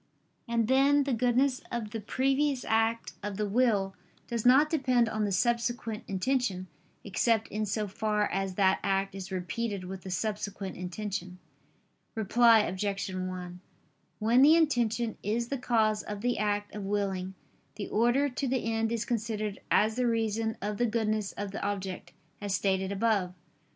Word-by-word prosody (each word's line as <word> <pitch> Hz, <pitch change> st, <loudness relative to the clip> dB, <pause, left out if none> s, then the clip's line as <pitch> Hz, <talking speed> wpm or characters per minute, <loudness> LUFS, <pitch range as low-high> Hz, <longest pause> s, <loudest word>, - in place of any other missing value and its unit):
And 230 Hz, -2 st, +1 dB
then 275 Hz, +3 st, +4 dB
the 275 Hz, -1 st, -1 dB
goodness 250 Hz, +3 st, +2 dB
of 230 Hz, -3 st, -3 dB
the 225 Hz, -, -4 dB
previous 270 Hz, +4 st, 0 dB
act 225 Hz, +1 st, +1 dB
of 205 Hz, -1 st, -4 dB
the 210 Hz, -1 st, -1 dB
will 205 Hz, -3 st, +2 dB, 0.3 s
does 235 Hz, -1 st, -1 dB
not 270 Hz, +5 st, +7 dB
depend 255 Hz, -6 st, +2 dB
on 215 Hz, -1 st, -1 dB
the 200 Hz, -, -1 dB
subsequent 235 Hz, +1 st, 0 dB
intention, 195 Hz, -1 st, 0 dB, 0.4 s
except 220 Hz, +2 st, +1 dB
in 215 Hz, 0 st, -2 dB
so 210 Hz, +1 st, -1 dB
far 210 Hz, +1 st, 0 dB
as 195 Hz, -1 st, -2 dB
that 190 Hz, -1 st, +3 dB
act 195 Hz, 0 st, 0 dB
is 190 Hz, -1 st, -7 dB
repeated 190 Hz, +2 st, -3 dB
with 190 Hz, +1 st, -7 dB
the 190 Hz, -, -8 dB
subsequent 200 Hz, 0 st, -3 dB
intention. 185 Hz, 0 st, -5 dB, 0.8 s
Reply 225 Hz, +1 st, +5 dB
Obj. 195 Hz, 0 st, -2 dB
1: 185 Hz, -1 st, -5 dB, 0.6 s
When 230 Hz, +4 st, +4 dB
the 300 Hz, +4 st, +8 dB
intention 240 Hz, -8 st, +1 dB
is 235 Hz, +4 st, -1 dB
the 275 Hz, -, -2 dB
cause 220 Hz, -3 st, +2 dB
of 205 Hz, -1 st, -6 dB
the 245 Hz, -1 st, 0 dB
act 205 Hz, -1 st, -1 dB
of 210 Hz, -, -5 dB
willing, 195 Hz, -2 st, -2 dB, 0.4 s
the 205 Hz, -1 st, -5 dB
order 240 Hz, +6 st, +2 dB
to 275 Hz, +1 st, -3 dB
the 255 Hz, -2 st, -1 dB
end 225 Hz, 0 st, 0 dB
is 230 Hz, -1 st, -1 dB
considered 215 Hz, -3 st, -2 dB
as 215 Hz, +2 st, +3 dB
the 250 Hz, -1 st, +2 dB
reason 225 Hz, 0 st, 0 dB
of 205 Hz, 0 st, -2 dB
the 240 Hz, -, +2 dB
goodness 215 Hz, -2 st, 0 dB
of 205 Hz, -1 st, -5 dB
the 200 Hz, -, -5 dB
object, 195 Hz, -2 st, -4 dB, 0.3 s
as 200 Hz, -2 st, -1 dB
stated 190 Hz, 0 st, 0 dB
above. 200 Hz, -3 st, 0 dB
215 Hz, 160 wpm, -29 LUFS, 195-235 Hz, 0.8 s, the